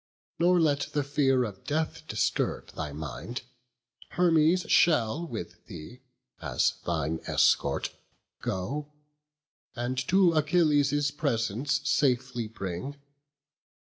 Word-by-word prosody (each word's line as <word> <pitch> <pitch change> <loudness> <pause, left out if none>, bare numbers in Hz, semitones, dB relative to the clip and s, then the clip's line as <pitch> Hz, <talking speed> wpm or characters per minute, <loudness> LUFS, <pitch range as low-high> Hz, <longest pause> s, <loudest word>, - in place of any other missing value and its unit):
Nor 175 +1 +4
let 145 -3 +2
the 145 - +1
fear 135 -2 +2
of 100 -5 -6
death 155 +2 -2
disturb - - -1
thy 75 -2 -5
mind: 80 - -6 0.7
Hermes 170 0 +4
shall 155 0 +3
with 110 - -7
thee, 125 +12 -10 0.4
as - - +1
thine 80 -1 -1
escort, - - +2 0.5
go, 145 +11 -3 0.8
And 120 +2 -2
to 185 -2 +4
Achilles' 145 -3 +2
presence 135 -1 -1
safely 125 -4 +1
bring. 100 +5 -5
140 Hz, 100 wpm, -28 LUFS, 115-155 Hz, 0.8 s, Nor